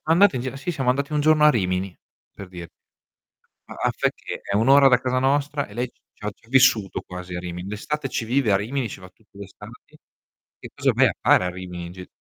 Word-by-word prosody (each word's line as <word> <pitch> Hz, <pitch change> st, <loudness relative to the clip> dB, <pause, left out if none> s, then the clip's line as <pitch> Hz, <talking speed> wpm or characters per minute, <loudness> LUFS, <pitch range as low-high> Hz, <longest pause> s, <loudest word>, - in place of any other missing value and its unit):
Andate 165 Hz, -2 st, +4 dB
via 130 Hz, +2 st, -5 dB
sì, 140 Hz, +6 st, -4 dB
siamo 135 Hz, -6 st, 0 dB
andati 140 Hz, +3 st, -2 dB
un 150 Hz, -, +1 dB
giorno 155 Hz, 0 st, +4 dB
a 150 Hz, -, +8 dB
Rimini, 95 Hz, -, -1 dB, 0.4 s
per 100 Hz, -, -10 dB
dir 90 Hz, -2 st, -9 dB, 1.0 s
Ma -, -, -9 dB
a -, -, +2 dB
fa' -, -, -1 dB
icché? -, -, -5 dB
È 100 Hz, -, -4 dB
1 110 Hz, +5 st, +2 dB
ora 140 Hz, 0 st, +7 dB
da 125 Hz, -2 st, +5 dB
casa 130 Hz, 0 st, 0 dB
nostra 140 Hz, +2 st, 0 dB
e 100 Hz, -, -15 dB
lei 120 Hz, +2 st, -2 dB
c -, -, -41 dB
c'ha 105 Hz, 0 st, -5 dB
c'ha 115 Hz, -, -27 dB
vissuto 120 Hz, -6 st, +3 dB
quasi 90 Hz, 0 st, -9 dB
a 90 Hz, -, -3 dB
Rimini. 90 Hz, 0 st, -7 dB
D'estate 135 Hz, +8 st, -4 dB
ci 120 Hz, -, -3 dB
vive 120 Hz, -1 st, +1 dB
a -, -, +5 dB
Rimini. 120 Hz, +5 st, -2 dB
Ci 100 Hz, -, -9 dB
va 90 Hz, -, -12 dB
tutte 100 Hz, +2 st, -28 dB
l'estati. 100 Hz, -1 st, -13 dB, 0.6 s
Che -, -, -10 dB
cosa -, -, +2 dB
vai -, -, +4 dB
a -, -, -1 dB
fare 90 Hz, -, +4 dB
a -, -, -1 dB
Rimini 90 Hz, -1 st, -7 dB
in 85 Hz, -, -9 dB
gi 90 Hz, 0 st, -10 dB
115 Hz, 235 wpm, -23 LUFS, 95-140 Hz, 1.0 s, a